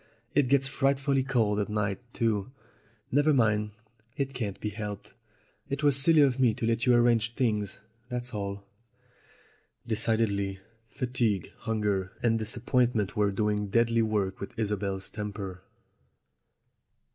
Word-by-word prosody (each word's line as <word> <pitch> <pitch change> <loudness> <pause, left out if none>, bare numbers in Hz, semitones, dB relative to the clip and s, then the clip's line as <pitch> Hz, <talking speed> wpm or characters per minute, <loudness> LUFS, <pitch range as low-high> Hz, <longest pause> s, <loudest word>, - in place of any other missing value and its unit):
It 145 -2 +3
gets 135 +1 +3
frightfully 135 0 +1
cold 110 -6 +1
at 105 - -1
night 105 -2 -1
too. 115 -2 -1 0.6
Never 145 +2 +4
mind; 105 -3 +2 0.5
it 135 -1 -2
can't 110 -6 -4
be 105 - -2
helped. 105 -1 -6 0.6
It 140 +2 -3
was 145 -2 +5
silly 150 +3 +5
of 135 -2 +3
me 120 -4 +4
to - - -3
let 115 +2 0
you 125 - +6
arrange 120 -1 +3
things, 105 -6 0 0.3
that's 125 0 -4
all." 100 -1 -4 1.2
Decidedly, 110 -3 +1 0.3
fatigue, 120 -7 -1
hunger, 105 -4 -1
and 115 -1 +3
disappointment 115 -1 0
were 105 -2 +2
doing 105 +1 0
deadly 115 +2 +2
work 105 -4 0
with 100 - -8
Isobel's 100 -3 -2
temper. 100 -3 -6
110 Hz, 130 wpm, -28 LUFS, 105-125 Hz, 1.2 s, you